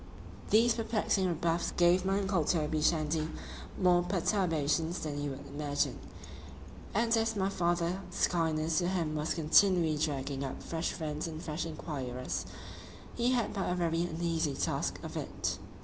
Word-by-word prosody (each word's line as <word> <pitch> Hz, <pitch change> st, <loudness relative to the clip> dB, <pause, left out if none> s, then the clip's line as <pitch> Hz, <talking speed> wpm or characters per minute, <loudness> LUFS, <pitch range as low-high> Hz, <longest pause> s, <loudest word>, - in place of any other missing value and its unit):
These 230 Hz, +3 st, +5 dB
perplexing 215 Hz, -4 st, 0 dB
rebuffs 170 Hz, 0 st, 0 dB
gave 175 Hz, +1 st, +4 dB
my 195 Hz, +1 st, +2 dB
uncle 190 Hz, -4 st, +1 dB
Toby 155 Hz, -1 st, 0 dB
Shandy 155 Hz, 0 st, +1 dB, 0.5 s
more 180 Hz, -2 st, +5 dB
perturbations 170 Hz, -3 st, 0 dB
than 145 Hz, -2 st, -3 dB
you 145 Hz, -, -2 dB
would 135 Hz, -, -7 dB
imagine; 145 Hz, 0 st, -1 dB, 0.9 s
and 230 Hz, +2 st, +2 dB
as 225 Hz, 0 st, +1 dB
my 195 Hz, -1 st, +1 dB
father's 175 Hz, 0 st, 0 dB
kindness 160 Hz, -1 st, +1 dB
to 175 Hz, -, 0 dB
him 170 Hz, -4 st, 0 dB
was 155 Hz, +1 st, -1 dB
continually 165 Hz, 0 st, +4 dB
dragging 140 Hz, -2 st, -1 dB
up 135 Hz, -, -5 dB
fresh 165 Hz, 0 st, -2 dB
friends 155 Hz, -1 st, -3 dB
and 160 Hz, -1 st, -6 dB
fresh 160 Hz, 0 st, -3 dB
enquirers,——he 150 Hz, -, -4 dB
had 240 Hz, -3 st, 0 dB
but 195 Hz, -, -1 dB
a 180 Hz, -, +1 dB
very 170 Hz, -2 st, +1 dB
uneasy 165 Hz, -3 st, -1 dB
task -, -, -1 dB
of -, -, -7 dB
it. -, -, -3 dB
165 Hz, 145 wpm, -31 LUFS, 155-185 Hz, 0.9 s, These